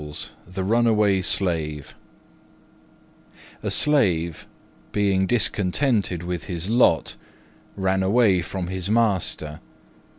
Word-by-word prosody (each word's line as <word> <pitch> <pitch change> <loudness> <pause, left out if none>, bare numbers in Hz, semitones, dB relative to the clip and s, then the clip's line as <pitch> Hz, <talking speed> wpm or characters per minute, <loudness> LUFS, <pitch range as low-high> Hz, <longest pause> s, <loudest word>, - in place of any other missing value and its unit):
THE 90 +1 -5
RUNAWAY 105 -2 +2
SLAVE 80 -7 -1 1.7
A - - -3
Slave, 90 - +1 0.4
being 100 -2 +1
discontented 105 - +1
with 90 -1 -4
his 90 +1 -4
lot, 115 -9 +2 0.6
ran 95 -1 0
away 100 -1 +3
from 90 +1 -5
his 95 +1 -3
master. 95 -9 0
95 Hz, 90 wpm, -23 LUFS, 85-105 Hz, 1.7 s, away